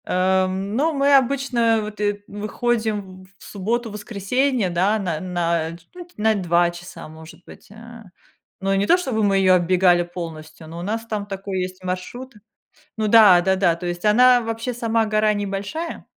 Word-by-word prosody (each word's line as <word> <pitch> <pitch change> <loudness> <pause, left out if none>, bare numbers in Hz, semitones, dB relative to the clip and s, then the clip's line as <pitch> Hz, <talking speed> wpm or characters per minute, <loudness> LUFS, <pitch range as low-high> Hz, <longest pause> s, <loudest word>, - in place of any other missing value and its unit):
Э, 185 +1 +1
ну, 200 +12 -1
мы 280 0 +3
обычно 250 -4 +2
вот, 210 0 -8
э, 205 0 -1
выходим 210 -2 -3
в - - -22
в - - -14
субботу-воскресенье, 220 +2 -1
да, 185 +5 +1
на 175 -7 -3
на, 170 -3 -2
ч 165 - -24
ну, 355 -1 -10
т 350 - -25
на 220 +1 +2
2 175 -2 +2
часа, 175 +1 -11
может 160 +2 -13
быть. - - -15
Э, 230 +1 -13 0.6
ну 195 0 -1
и - - +1
не 195 - +1
то 355 - +5
чтобы 255 -11 -2
мы 200 -1 +2
её 185 -1 +4
оббегали 180 0 +3
полностью, 160 -2 -9
но 165 +2 -9
у - - -6
нас 225 +4 -3
там 210 -2 -3
такой 195 -1 -5
есть 185 0 -6
маршрут. 185 +8 -6 0.6
Ну 215 -1 -1
да, 205 -5 +7
да-да, 185 -2 +2
то 175 +1 -8
есть 175 +3 -5
она 245 +3 +5
вообще 225 +2 -4
сама 230 -1 0
гора 215 0 +1
небольшая, 205 +11 -5
205 Hz, 180 wpm, -21 LUFS, 185-230 Hz, 0.6 s, да